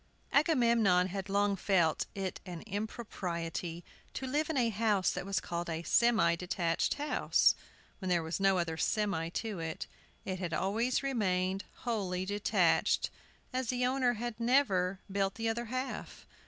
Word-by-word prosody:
AGAMEMNON 235 - +4
had 195 +1 -5
long 200 0 +2
felt 175 -5 +2
it 190 -2 -3
an 175 -3 -7
impropriety 175 -5 -4 0.3
to 265 - -3
live 295 +4 0
in 320 - -1
a 240 -3 +3
house 210 -3 +2
that - - -4
was 195 -1 +1
called 170 0 -4
a 165 0 -3
"semi 215 -6 +4
detached" 175 -1 0
house, 295 +1 +3 0.5
when 185 - -3
there 175 -2 +2
was 160 +3 -3
no 195 -1 +4
other 165 -2 -1
"semi" 195 -4 0
to 210 +1 -3
it. 160 -1 -4 0.4
It 185 -1 -3
had 170 -3 -2
always 225 - 0
remained 190 -7 0 0.2
wholly 190 -6 -1
detached, 205 +1 +2 0.4
as 255 -1 -1
the 250 +1 +1
owner 255 -1 +2
had 240 0 -5
never 215 -7 +2
built 195 0 0
the 225 0 -2
other 235 +2 -1
half. 255 +3 -5
195 Hz, 155 wpm, -32 LUFS, 180-235 Hz, 0.5 s, AGAMEMNON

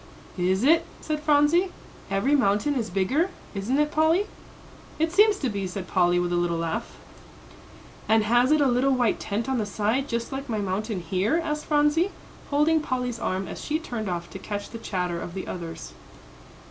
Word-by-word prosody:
"Is 185 +3 +1
it?" 325 +5 +5 0.2
said 305 -1 -3
Phronsie. 300 +5 +3 0.4
"Every 195 +9 +1
mountain 245 +3 +2
is 235 -5 -2
bigger, 230 - +1 0.2
isn't 210 +7 -1
it, 300 0 +2
Polly?" 320 +6 +3 0.7
"It 320 +1 +1
seems 415 +2 +5
to 280 - -1
be," 200 -4 -2
said 185 0 -6
Polly, 175 -1 +3
with 175 0 0
a - - +2
little 175 -1 0
laugh. 165 -1 -3 1.1
"And 220 0 +5
has 240 +5 +3
it 310 -1 +4
a - - +4
little 260 +2 +3
white 245 -3 +1
tent 215 +4 -3
on 265 -2 0
the 215 - 0
side, 220 +7 0
just 235 -3 -3
like 270 0 -5
my 220 - -1
mountain 205 0 -2
here?" 190 - +1
asked 300 -2 -3
Phronsie, 295 +4 +3 0.4
holding 300 +3 +3
Polly's 250 -4 -2
arm 190 -3 -2
as - - -7
she 310 - 0
turned 235 - -4
off 175 -1 -3
to 190 - -7
catch 205 0 -5
the 230 - -7
chatter 180 -5 -2
of 175 - -7
the 190 - -4
others. 165 - -7
235 Hz, 185 wpm, -25 LUFS, 190-295 Hz, 1.1 s, it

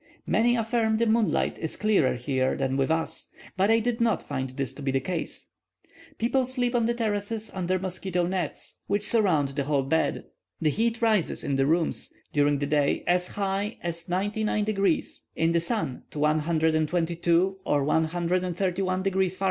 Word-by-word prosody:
Many 240 +2 +3
affirm 225 -1 +1
the 235 - +2
moonlight 220 -1 +1
is 160 - -3
clearer 205 -13 +2
here 130 +1 0
than 135 -1 -1
with 135 +1 +1
us, 160 0 -2 0.3
but 190 +2 +2
I 225 - +5
did 230 +1 -1
not 230 -2 +2
find 130 -2 -3
this 130 -1 -4
to - - -10
be 135 - -1
the 135 0 +2
case. 170 +4 -5 0.7
People 250 +3 +1
sleep 250 -1 0
on 235 -2 +2
the 235 - 0
terraces 215 -1 -2
under 185 0 0
mosquito 185 -1 -2
nets, 185 0 -4
which 205 +1 0
surround 185 -11 +3
the 140 0 -3
whole 140 -1 +1
bed. 160 +5 0 0.4
The 155 -2 +2
heat 230 +5 0
rises 215 -6 +2
in 140 - -1
the 135 0 +2
rooms, 165 +1 0 0.2
during 145 -1 +3
the 145 - -1
day, 145 -1 +1
as 180 0 +2
high 200 +2 -2
as 170 0 -4
99 210 +3 0
degrees; 195 -5 0
in 165 +1 +2
the 170 - +3
sun, 170 - -2
to - - -10
122 165 +4 +1
or 145 -1 +1
131 180 +4 0
degrees 190 -1 +1
Fah. - - -20
180 Hz, 170 wpm, -26 LUFS, 155-210 Hz, 0.7 s, I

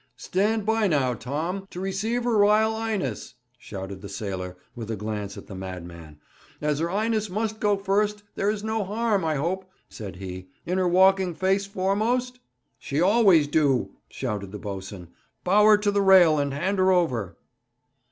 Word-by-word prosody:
'Stand 205 - 0
by 220 -1 +2
now, 140 -7 +1
Tom, 160 - -4
to 180 - -8
receive 210 +6 -2
her 240 -1 +1
Ryle 215 +1 +4
'Ighness!' 210 - -3 0.2
shouted 95 -2 -7
the 100 - -8
sailor, 95 -3 -5 0.2
with 115 -2 -7
a 110 - -1
glance 105 -1 -5
at - - -9
the - - -10
madman. 85 -5 -8 0.4
'As 150 -1 -1
her 165 +1 -1
'Ighness 215 +2 0
must 220 +3 -2
go 205 -1 +2
first, 205 +1 0
there's 205 +1 -1
no 220 -1 -1
harm, 210 0 0
I 160 -1 0
hope,' 185 +6 -2 0.2
said 100 -4 -8
he, 95 0 -8 0.2
'in 180 +2 -1
her 185 - +2
walking 190 0 +4
face 195 +2 +1
foremost?' 220 +6 -1 0.4
'She 140 - -3
always 190 -4 +5
do,' 145 -3 +1 0.2
shouted 105 -7 -4
the 105 - -6
boatswain. 95 -3 -7 0.3
'Bow 205 +3 +4
her 215 -1 +7
to 205 0 0
the 200 0 +1
rail, 180 -6 +6
and 140 -1 0
hand 190 +8 -1
her 185 0 +4
over.' 125 - 0
185 Hz, 170 wpm, -25 LUFS, -, 0.4 s, her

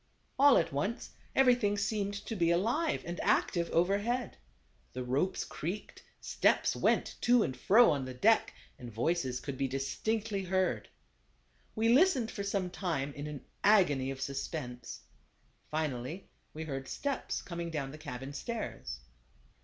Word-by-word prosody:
All 280 -1 +7
at 165 - 0
once 195 - -2 0.2
everything 245 -6 +4
seemed 205 0 -1
to 225 - -4
be 170 -4 +2
alive 235 - +1
and 175 0 -5
active 170 -1 +1
overhead. 205 +8 +1 0.6
The 125 - -4
ropes 140 +10 0
creaked, 180 +7 -6 0.2
steps - - +2
went - - +1
to 240 -2 +5
and 130 - -3
fro 215 - +6
on 140 -3 -1
the 130 - -6
deck, 220 - +3 0.3
and 120 -2 -8
voices 130 +2 0
could 140 -1 -6
be 135 - +1
dis 135 +1 -3
tinctly 215 -3 -1
heard. 180 - 0 0.9
We 220 +1 +1
listened 260 -3 +4
for 200 - -5
some 200 -2 -1
time 155 -7 -2
in 145 +1 -6
an 150 -2 -7 0.2
agony 150 -11 +4
of 135 -1 -5
suspense. 135 -3 -5 0.7
Finally 155 +2 -3 0.2
we 160 - -6
heard 135 -3 -5
steps 285 -1 -3
coming 170 -1 -5
down 140 -4 -3
the 155 - -10
cabin 135 -2 -7
stairs. 145 - -5
170 Hz, 145 wpm, -32 LUFS, 135-210 Hz, 0.9 s, All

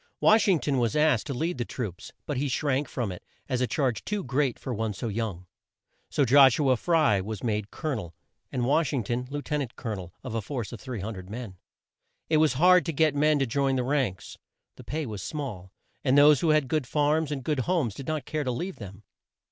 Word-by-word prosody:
Wash 215 0 +5
ing 190 -4 +5
ton 140 -3 0
was 115 -3 0
asked 150 -6 +3
to 140 - -2
lead 160 +2 -2
the - - +1
troops, 110 -7 -6
but 145 - -3
he 145 +3 0
shrank 140 +1 0
from 115 -6 -3
it 90 - -9 0.2
as 130 -2 -1
a 125 - +2
charge 130 -7 -1
too 210 -1 -2
great 135 -1 0
for 130 - -5
one 110 -2 -2
so 115 +4 -4
young. 100 -4 -3 0.6
So 140 - +2
Josh 135 0 +7
u 140 -3 +2
a - - +5
Fry 150 - +2
was 105 +1 -6
made 105 -3 -1
Col 155 -2 -4
o - - +1
nel, 85 -9 -6 0.4
and 125 -1 -1
Wash 150 +4 +2
ing 130 -5 0
ton 120 +4 -2
Lieu 145 +1 -4
ten 150 -1 -1
ant 125 -4 -6
Col 115 - -5
o - - -2
nel 90 -2 -9
of - - -6
a 115 - -1
force 120 0 -5
of 120 - -8
300 105 -7 -6
men. 110 -3 -7 0.8
It 155 - +5
was 155 -4 +4
hard 180 +7 +6
work - - -10
to 165 - -2
get 155 0 +3
men 150 +1 +3
to 135 - +1
join 135 +2 +1
the 125 - 0
ranks. 125 -8 -2 0.4
The - - -12
pay 155 +1 -3
was 105 -5 -6
small, 105 - -5 0.3
and 135 0 +3
those 145 -1 +7
who 165 - +1
had 155 -3 +3
good 145 -1 -1
farms 150 +1 +1
and 135 -3 -3
good 150 0 -1
homes 150 - 0
did 135 - -9
not 155 -4 -2
care 155 -1 -2
to 130 - -2
leave 175 +10 -4
them. 100 0 -10
130 Hz, 245 wpm, -27 LUFS, 115-150 Hz, 0.8 s, Josh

